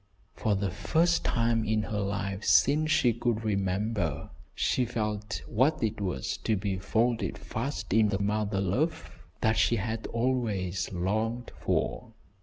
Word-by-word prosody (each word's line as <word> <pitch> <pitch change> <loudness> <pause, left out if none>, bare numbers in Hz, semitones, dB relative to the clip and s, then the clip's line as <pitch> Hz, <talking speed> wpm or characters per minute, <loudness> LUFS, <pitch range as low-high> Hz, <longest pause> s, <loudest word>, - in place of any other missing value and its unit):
For 105 -2 0
the 100 -1 -1
first 170 - +2
time 115 -1 +1
in 110 0 +1
her 105 -1 -3
life 100 0 -2
since 155 +3 +4
she 125 -6 +4
could 115 -1 -1
remember, 100 -5 -1 0.2
she 130 - +1
felt 105 -3 -3
what 135 +5 +1
it 110 -1 -1
was 90 -10 -2
to 110 - 0
be 95 -1 -2
folded 110 0 0
fast 120 -1 -4
in 110 -1 +4
the 100 - 0
mother 105 0 0
love 145 - -1 0.3
that 110 -1 +2
she 115 +2 +3
had 110 +1 -3
always 110 -7 -1
longed 110 +6 -1
for. - - -1
110 Hz, 145 wpm, -29 LUFS, 100-120 Hz, 0.3 s, since